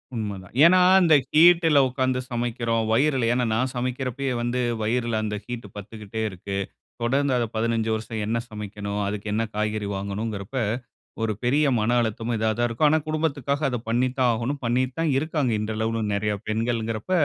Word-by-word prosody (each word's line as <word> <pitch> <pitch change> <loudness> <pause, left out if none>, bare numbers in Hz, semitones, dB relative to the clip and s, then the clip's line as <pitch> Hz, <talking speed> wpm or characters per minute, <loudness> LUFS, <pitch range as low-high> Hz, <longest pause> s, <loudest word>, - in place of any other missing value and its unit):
உண்மதான். 100 -4 -5
ஏன்னா, 185 +2 +7 0.2
அந்த 160 -3 +6 0.2
ஹீட்ல 165 -2 +6
உட்கார்ந்து 130 0 0
சமைக்கிறோம். 115 -1 -1
வயிறில 130 0 +2
ஏன்னா 125 0 +1
நான் 130 +3 0
சமைக்கிறபோவே 130 +2 -2
வந்து 120 +1 -1 0.2
வயிறில 115 0 0
அந்த 105 -1 -2
ஹீட் 120 -3 -6
பட்டுக்கிட்டே 105 +1 -7
இருக்கு. 100 +1 -5 0.4
தொடர்ந்து 135 +3 +1
அத 120 - +1
15 115 0 0
வருஷம் 110 0 -4
என்ன 115 +2 0
சமைக்கணும், 105 -1 -5
அதற்கு 105 +1 -4
என்ன 115 +2 +1
காய்கறி 105 -1 -1
வாங்கணும் 100 +2 -3
என்கிறப 100 +4 -7 0.7
ஒரு 110 - 0
பெரிய 145 +4 +3
மன 115 +3 +1
அழுத்தமும் 115 +1 -2
இதுவா 110 0 +1
தான் 120 0 +2
இருக்கும். 120 +6 +2
ஆனா, 160 +1 +3
குடும்பத்திற்காக 145 -3 -1
அத 125 - -2
பண்ணி 120 +3 +2
தான் 125 -2 +4
ஆகணும். 120 +5 -3
பண்ணிட்டு 125 +2 0
தான் 165 -2 +1
இருக்காங்க. 150 -4 0
இந்த 110 +1 -3
அளவுல 110 0 -1
நெறைய 105 +1 0
பெண்கள் 115 +2 0
என்கிறப 110 - -4
115 Hz, 165 wpm, -24 LUFS, 110-130 Hz, 0.7 s, ஏன்னா